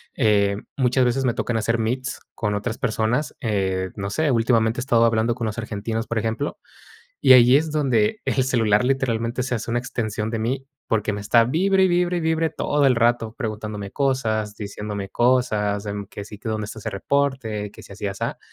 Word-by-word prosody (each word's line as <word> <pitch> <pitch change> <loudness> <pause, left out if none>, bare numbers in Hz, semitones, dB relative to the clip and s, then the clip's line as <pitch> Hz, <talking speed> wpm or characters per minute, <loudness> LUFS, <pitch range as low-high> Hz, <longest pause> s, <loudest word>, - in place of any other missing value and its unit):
eh, 100 -4 +2 0.2
muchas 130 -1 +3
veces 130 +2 +1
me 120 - +2
tocan 115 0 -1
hacer 115 +1 0
meets 125 +3 -2 0.2
con 105 -2 -1
otras 105 +3 -3
personas. 120 +4 -1
Eh, 95 -5 -1
no 100 -1 -4
sé, 155 +6 +1
últimamente 115 -2 +2
he - - -1
estado 120 -3 +3
hablando 115 +1 +2
con 120 -2 -3
los 110 - -4
argentinos, 110 0 -3
por 115 - -1
ejemplo, 115 +6 -3 0.6
y - - +8
ahí 125 +1 +7
es 155 +1 -1
donde 210 - +1
el 130 - +1
celular 115 -4 +2
literalmente 125 -2 0
se 130 - -3
hace 115 - -5
una 120 +1 +1
extensión 110 -3 -3
de 115 - -2
mí, 130 +4 -2 0.2
porque 105 -1 0
me 100 - -4
está 115 +3 +4
vibre, 190 +9 +2
y 190 - +5
vibre, 175 0 +1
y - - -2
vibre 160 0 +1
todo 145 -1 +1
el 125 - +4
rato. 115 -1 +1
Preguntándome 105 -4 -5
cosas, 110 -7 0
diciéndome 105 -1 -5
cosas, 110 -4 +1
de, 105 -1 -4
mm, 100 -1 -5
que 100 0 -8
si 105 0 -10
tu 110 - -5
dónde 110 -1 -2
está 110 +1 -8
ese - - -4
reporte, 115 -2 -1
que 110 - -13
si 100 - -14
así, 100 +1 -4
asá. 100 0 -4
115 Hz, 205 wpm, -23 LUFS, 105-130 Hz, 0.6 s, y